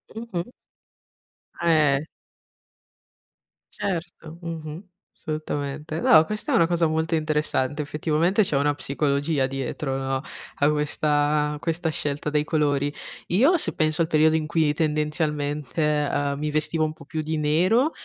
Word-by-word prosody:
Mh-mh. 210 -7 -4 1.1
Eh! 155 -5 +3 1.7
Certo, 170 -3 -5
Mh-mh. 165 0 -6 0.3
assolutamente. 155 0 -4
No, 160 -1 +6
questa 210 +4 -4
è - - +4
una 165 - +4
cosa 170 -2 +2
molto 160 +1 0
interessante. 150 -2 0
Effettivamente 155 +7 +1
c'è 145 -6 0
una 145 +1 +2
psicologia 140 0 0
dietro, 135 +1 -3
no, 135 0 -2 0.3
a 145 +1 +3
questa 150 0 +1
questa 165 0 -1
scelta 150 -1 -2
dei 150 0 +1
colori. 145 -2 +1 0.4
Io 275 - +4
se - - +2
penso 155 0 +1
al 160 - +2
periodo 160 0 +4
in 155 -1 -1
cui 160 -2 +2
tendenzialmente, 150 -1 -1 0.3
ehm, 140 0 -1
mi 150 0 -1
vestivo 155 +1 +1
un 155 - -3
po' 140 - -15
più 155 +2 -3
di 155 +1 -2
nero, 185 - +2
155 Hz, 135 wpm, -24 LUFS, 145-165 Hz, 1.7 s, No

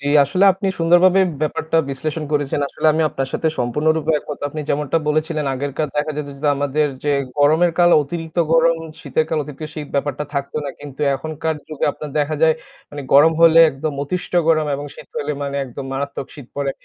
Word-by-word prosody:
জি, 140 - -6 0.2
আসলে 185 +7 +2
আপনি 190 +2 -4
সুন্দরভাবে 175 +3 +5 0.2
ব্যাপারটা 160 +1 -1
বিশ্লেষণ 155 +3 -3
করেছেন। 145 -1 0
আসলে - - -2
আমি 160 - +1
আপনার 135 -2 -3
সাথে 160 - 0
সম্পূর্ণরূপে 155 +6 +1
একমত। 145 0 -7
আপনি 155 +2 -6
যেমনটা 150 +2 0
বলেছিলেন 155 0 0
আগেরকার 145 +3 -3
দেখা 150 +1 0
যেত 150 -1 -4
যে, 150 - -2
আমাদের 145 +2 +1 0.2
যে 145 - +2 0.3
গরমের 155 +4 +4
কাল 175 0 +5
অতিরিক্ত 160 +2 -7 0.2
গরম, 165 0 +4 0.2
শীতের 160 - 0
কাল 160 - 0
অতিরিক্ত 150 +1 -8
শীত 150 -2 -6
ব্যাপারটা 145 +1 -1
থাকত 140 0 -3
না। 140 - -3
কিন্তু 145 -1 -10
এখনকার 160 +2 -3
যুগে 155 -2 -3
আপনার 150 -2 -8
দেখা 150 +1 0
যায় 160 -1 +5 0.4
মানে 145 -1 -7
গরম 150 +4 +7
হলে 165 0 +7
একদম 145 +3 -4
অতিষ্ঠ 180 +5 -4 0.2
গরম 155 -2 +3
এবং 145 - -6
শীত - - -13
হলে 150 +1 -2
মানে 140 0 -3
একদম 135 +1 -8
মানে 135 - -5
মারাত্মক 140 -1 -4
শীত 140 -5 -11
পড়ে। 140 -1 -1
150 Hz, 190 wpm, -20 LUFS, 140-160 Hz, 0.4 s, গরম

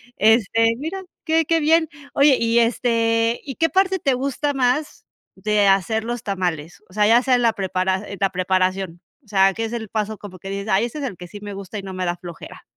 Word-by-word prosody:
Este, 225 +1 +3
mira, 330 +8 -5 0.2
qué 320 0 +3
qué 330 +1 +1
bien. 320 +1 +3 0.2
Oye, 280 -2 +5
y, 230 +1 +2
este, 230 -1 +1
¿y 270 -3 -7
qué 325 - +2
parte 380 0 +2
te 275 - +1
gusta 275 +3 -1
más 270 +3 0 0.3
de 210 -1 +1
hacer 195 +3 +2
los 240 0 -4
tamales? 175 -6 -3
O - - -18
sea, 210 +1 +3
ya 230 +2 +6
sea 255 0 +3
en 245 - +1
la 230 -1 +4
preprara 190 -1 -1
en 200 - -7
la 195 - +3
preparación. 185 -1 -1 0.2
O - - -29
sea, 195 -2 +3
que 225 +3 -3
es 225 - -6
el 220 -3 -5
paso 215 0 -2
como 190 -3 -11
que 195 - -8
dices: 200 +2 -4
"Ay, 195 +4 +3
este 295 +6 -6
es - - -5
el 210 -9 -4
que 180 - -9
sí 205 +3 -11
me 205 0 -7
gusta 195 +1 -7
y - - -4
no 195 -1 -8
me 185 0 -3
da 175 0 -1
flojera". 175 -1 -11
220 Hz, 235 wpm, -21 LUFS, 195-250 Hz, 0.3 s, ya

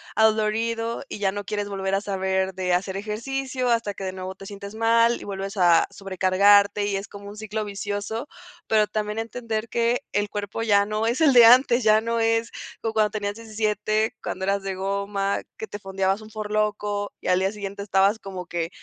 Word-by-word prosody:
adolorido, 225 +2 +1
y - - -5
ya 195 -1 +1
no 205 0 -4
quieres 205 0 -3
volver 195 -1 -3
a - - +2
saber 190 -1 -1
de 180 -1 -1
hacer 190 +1 0
ejercicio 255 +5 -3
hasta 230 -3 +1
que 195 - -7
de 185 - -3
nuevo 185 0 -6
te 195 - -12
sientes 200 +1 -8
mal, 230 +1 +3
y - - -10
vuelves 195 0 -5
a 175 -2 +5
sobrecargarte, 200 +2 +3
y 200 -1 -1
es 195 +1 -4
como 200 0 -10
un 205 - -9
ciclo 215 0 -4
vicioso. 205 +5 -4 0.4
Pero, 215 -1 +3
también 210 +2 -3
entender 225 -1 -3
que 235 +3 0
el 205 0 0
cuerpo 205 +2 -4
ya 200 -2 +4
no 215 +1 -1
es 240 +5 0
el 300 -4 +5
de 240 -2 +9
antes, 245 0 +6
ya 215 0 +5
no 230 +1 -1
es 225 0 +1 0.3
como 225 -1 -2
cuando 215 -1 +3
tenías 205 -1 -3
17, 215 0 -1
cuando 190 0 -3
eras 200 0 +1
de 195 -1 -3
goma, 200 +1 -1 0.2
que 220 - -6
te 205 - -7
fondeabas 195 +1 -1
un 215 - -12
Four 215 -1 -6
Loko, 210 -1 -1
y - - -8
al 180 0 +3
día 190 +1 +1
siguiente 200 -1 -6
estabas 200 +2 +2
como 185 -2 -7
que, 170 -1 -3
205 Hz, 205 wpm, -24 LUFS, 195-220 Hz, 0.4 s, de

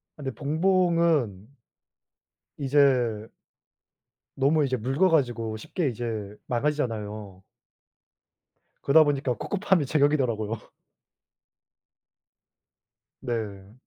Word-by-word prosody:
아 - - -62
근데 135 -1 -3
봉봉은 160 - +1 1.0
이제 130 -6 +2 1.0
너무 145 +2 +2
이제 130 -1 -1
묽어 135 - +1
가지고 120 -8 0
쉽게 145 +6 -2
이제 110 -3 -5
망가지잖아요. 110 -8 -3 1.4
그러다 155 +3 +6
보니까 140 -3 0
코코팜이 190 - 0
제격이더라고요. 130 -7 +1 2.6
네. 105 -5 -5
130 Hz, 195 characters per minute, -26 LUFS, 110-150 Hz, 2.6 s, 그러다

